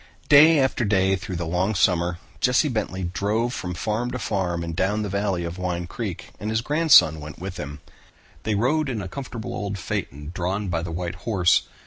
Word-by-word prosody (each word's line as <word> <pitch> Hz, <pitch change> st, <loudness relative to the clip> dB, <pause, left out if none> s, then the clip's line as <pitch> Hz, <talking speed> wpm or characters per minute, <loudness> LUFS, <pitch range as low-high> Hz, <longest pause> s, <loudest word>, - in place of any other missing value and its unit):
Day 155 Hz, +3 st, +8 dB
after 130 Hz, -2 st, +1 dB
day 95 Hz, -2 st, +3 dB
through 95 Hz, -1 st, -6 dB
the 85 Hz, 0 st, -3 dB
long 90 Hz, +6 st, 0 dB
summer, 90 Hz, -2 st, +2 dB, 0.2 s
Jesse 125 Hz, +4 st, +3 dB
Bentley 100 Hz, -6 st, -2 dB
drove 105 Hz, +7 st, -1 dB
from 90 Hz, -6 st, -4 dB
farm 110 Hz, +6 st, -1 dB
to 125 Hz, -, -3 dB
farm 95 Hz, -6 st, -1 dB
up -, -, -3 dB
and 85 Hz, -1 st, -5 dB
down 105 Hz, +5 st, 0 dB
the 105 Hz, -, -3 dB
valley 100 Hz, -2 st, -1 dB
of 85 Hz, +2 st, -5 dB
Wine 90 Hz, -1 st, -2 dB
Creek, 100 Hz, 0 st, -6 dB
and 105 Hz, -, -4 dB
his 110 Hz, +1 st, +1 dB
grandson 145 Hz, -, +5 dB
went 75 Hz, +1 st, -9 dB
with 90 Hz, 0 st, -6 dB
him. 75 Hz, +1 st, -7 dB, 0.6 s
They 110 Hz, +2 st, -1 dB
rode 140 Hz, +7 st, +1 dB
in 110 Hz, -6 st, -3 dB
a -, -, -5 dB
comfortable 115 Hz, +2 st, -6 dB
old 100 Hz, -1 st, -3 dB
phaeton 75 Hz, -3 st, -4 dB
drawn 95 Hz, +3 st, -2 dB
by 85 Hz, -2 st, -1 dB
the 85 Hz, -, -5 dB
white 85 Hz, +1 st, -3 dB, 0.2 s
horse. 90 Hz, -5 st, +3 dB
95 Hz, 200 wpm, -24 LUFS, 85-110 Hz, 0.6 s, Day